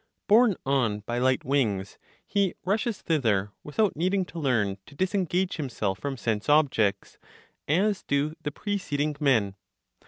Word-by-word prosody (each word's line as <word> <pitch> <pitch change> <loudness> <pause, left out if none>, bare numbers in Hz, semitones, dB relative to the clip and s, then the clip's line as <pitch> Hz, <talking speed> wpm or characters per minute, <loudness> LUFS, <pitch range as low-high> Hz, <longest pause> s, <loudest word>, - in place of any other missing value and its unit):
Borne 215 0 +5
on 120 -6 +1
by 120 +3 -3
light 130 0 +1
wings, 110 -8 0 0.3
he 200 -3 0
rushes 215 +3 0
thither 110 - +1
without 195 +7 0
needing 185 +4 +1
to 170 - -8
learn 110 -9 0
to 145 - -15
disengage 185 0 0
himself 110 - -2
from 140 +2 -4
sense 110 0 -2
objects, 125 -10 +2 0.5
as 195 +6 +2
do 140 +2 0
the 150 - -2
preceding 150 -5 -2
men. 115 -10 +2
145 Hz, 135 wpm, -27 LUFS, 115-185 Hz, 0.5 s, Borne